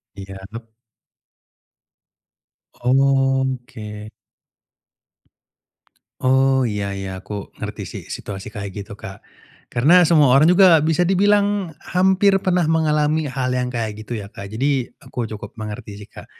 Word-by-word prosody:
Iyap. 100 +4 -10 2.1
Oke. 130 -5 0 2.1
Oh, 130 0 +3
iya 105 -3 -3
iya 95 -1 -6
aku 105 -1 -7
ngerti - - -5
sih - - -8
situasi 95 -2 -7
kayak 100 -3 -7
gitu, 100 0 -11
Kak. 95 0 -10 0.5
Karena 155 +10 +5
semua 150 -6 +5
orang 155 +5 +6
juga 180 -4 +6
bisa 160 +3 +2
dibilang 200 0 +2
hampir 190 +2 +2
pernah 180 -3 +1
mengalami 155 -1 +1
hal 130 0 -2
yang 125 0 -1
kayak 110 -3 -4
gitu 115 +1 -5
ya, 100 - -7
Kak, 100 -1 -10
jadi 130 +3 -1
aku 120 -2 -6
cukup 105 -1 -8
mengerti 105 -2 -7
sih, 105 +1 -12
Kak. - - -12
130 Hz, 120 wpm, -20 LUFS, 105-160 Hz, 2.1 s, orang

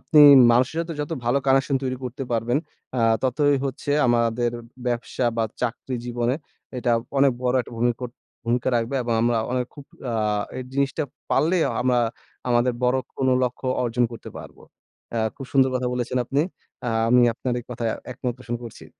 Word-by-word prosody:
আপনি 155 - +2 0.3
মানুষের 125 +6 +2
সাথে 170 0 -4
যত 150 +2 -3
ভালো 125 +4 +3
কানেকশন 135 +1 +3
তৈরি 130 -1 -1
করতে 125 +2 -5
পারবেন 120 +4 +1 0.4
আ - - +2 0.2
ততই 145 +2 +2
হচ্ছে 135 +1 -4 0.2
আমাদের 120 0 +2 0.3
ব্যবসা 120 +1 -1
বা 115 - +2 0.2
চাকরি 125 +2 -2
জীবনে 120 +1 0 0.4
এটা 120 0 0 0.3
অনেক 135 -2 +5
বড় 125 0 +1
একটা - - -13
ভূমি 120 +1 +3
কোট 125 -1 -5 0.3
ভূমিকা 120 +2 0
রাখবে 115 +4 -1
এবং 120 -1 -1
আমরা 120 -1 +2
অনেক 125 -1 0
খুব 145 -2 -11 0.3
আ - - -2 0.4
এই - - -3
জিনিসটা 140 +3 0 0.3
পারলে 170 +4 +3 0.3
আমরা 125 -1 +3 0.5
আমাদের 120 +1 +3
বড় 125 +1 +3 0.2
কোনো 130 -1 +2
লক্ষ্য 125 +1 -2 0.2
অর্জন 120 0 +1
করতে 115 - -9
পারবো। - - -12 0.5
অ্যা 115 - 0 0.2
খুব 135 - -8
সুন্দর 130 -1 +4
কথা 125 -1 0
বলেছেন 125 +1 -1
আপনি। 135 +4 0 0.5
আ - - +1 0.2
আমি 125 0 +6
আপনার 125 0 -3
এই - - -15
কথায় 115 -2 -2 0.2
একমত 125 -1 -3
প্রশন 120 -1 -4
করছি। 115 - -10
125 Hz, 175 wpm, -24 LUFS, 120-135 Hz, 0.5 s, আমি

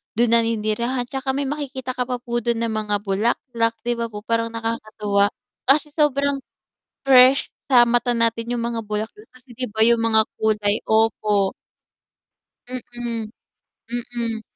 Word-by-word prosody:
dun 235 0 +2
naninirahan, 230 +2 +1
tsaka 265 0 -2
may 280 - 0
makikita 265 -3 -4
ka 250 - 0
pa 250 - -2
po 240 -1 -2
dun 235 0 -1
ng 230 - -1
mga 215 -1 -1
bulaklak, 230 +3 0
'di 240 0 0
ba 230 - -1
po, 210 0 -8
parang 230 0 0
nakakatuwa 215 -3 0 0.4
kasi 295 +3 +4
sobrang 280 -2 +2 0.6
fresh 265 0 +6 0.2
sa 255 -3 +6
mata 240 +1 +1
natin 230 +1 0
yung 235 - -2
mga 235 -1 -2
bulaklak, 215 - -5
kasi, 255 -1 -16
di 255 - -2
ba, 220 +1 -2
yung 235 +1 +4
mga 220 -1 +5 0.2
kulay 210 -1 +1
opo. 215 -3 +2 1.2
Mm, 240 -3 -5 0.9
mm. 230 -2 -2
230 Hz, 145 wpm, -22 LUFS, 220-255 Hz, 1.2 s, fresh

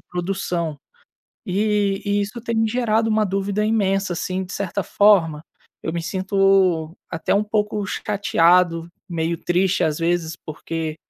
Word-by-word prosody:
produção 175 -3 -3 0.7
e 205 0 +1
e 205 0 +1
isso 210 +4 -4
tem 225 -1 0
gerado 225 -1 +1
uma 215 0 +2
dúvida 200 +2 -1
imensa 195 -3 +1
assim, 185 +2 -3
de 185 - -10
certa 200 0 -2
forma, 165 -6 +3 0.4
eu 160 - -3
me 170 - -3
sinto 190 -3 +2 0.2
até 165 - -1
um 205 - +3
pouco 210 -1 -1
chateado, 180 -4 +2 0.2
meio 170 -1 -1
triste, 185 +1 +1
às 155 -1 0
vezes, 165 -1 -1
porque 160 0 -4
190 Hz, 135 wpm, -22 LUFS, 170-205 Hz, 0.7 s, forma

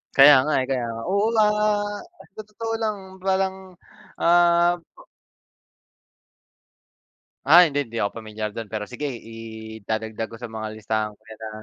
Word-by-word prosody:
Kaya 145 +2 +9
nga, 150 +2 -1
eh, - - -2
kaya 130 -2 0
nga 115 - -6
oo, 200 +3 +2
ah, 210 -1 +1 0.3
tot 215 - -9
totoo 225 +2 -4
lang 215 -2 -1 0.2
parang, 190 0 0 0.6
ah 175 0 +4 2.7
Ah, 175 +4 +9
hindi 145 -5 0
hindi 115 - -11
ako 100 +3 -3
pamilyar 110 -1 -5
dun 115 0 -7
pero 105 0 -4
sige 125 +7 -5
idadagdag 110 -2 -6
ko 115 - -11
sa 120 -1 -8
mga 110 -1 -5
listahan 110 0 -2
ko 110 - -42
'yan 110 -1 -13
na 110 - -5
125 Hz, 145 wpm, -23 LUFS, -, 2.7 s, Kaya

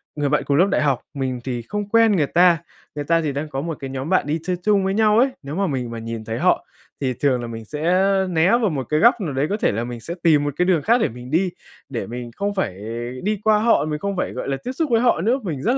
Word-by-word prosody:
người 145 -2 0
bạn 150 - +1
cùng 140 - +1
lớp 180 +5 +5
đại - - +1
học, 140 -4 +1
mình 130 -3 -3
thì 125 -2 -3
không 205 - -5
quen 230 0 +5
người 150 -4 +2
ta, 175 0 +4 0.4
người 145 -1 -4
ta 165 +2 +2
thì 150 -3 -1
đang 145 +3 -4
có 135 -2 -3
một 165 -1 -4
cái 135 - -5
nhóm 135 +3 -5
bạn 185 -6 +2
đi 155 +3 -1
chơi 180 +1 -1
chung 205 -1 +3
với 190 - 0
nhau 215 +1 +4
ấy, 265 +3 +4
nếu 140 +2 -6
mà 195 +1 0
mình 125 -6 -3
mà 115 - -5
nhìn 115 -1 -6
thấy 115 +1 -4
họ - - +2 0.4
thì 130 -2 0
thường 130 -1 +1
là 120 - -5
mình 115 -1 -7
sẽ 150 +7 -6 0.5
né 170 +1 +3
vào 235 -3 +3
một 135 -4 -2
cái 150 - +2
góc 235 +2 +5
nào 160 -7 -3
đấy, 135 +3 0
có 205 - 0
thể - - +1
là 115 +3 -2
mình 120 0 -6
sẽ 170 +8 -6
tìm 155 -4 +4
một 145 -1 -2
cái 180 - +2
đường 180 -5 +2
khác 235 +2 +3
để - - +2
mình 125 +3 -10
đi, 180 +3 +2 0.4
để 120 -4 -4
mình 120 0 -6
không 200 0 -2
phải 95 - -2 0.4
đi 210 +1 0
qua 215 -1 +4
họ, 225 -7 +3
mình 150 -1 -3
không 200 +3 -3
phải, - - -1
gọi 125 - -5
là, 135 - -1
tiếp 250 - -3
xúc 310 +3 -2
với 230 -1 +4
họ 240 -8 +3
nữa. 235 +8 +2
Mình 155 -9 -4
rất 250 +3 +2
155 Hz, 295 wpm, -21 LUFS, 135-200 Hz, 0.5 s, lớp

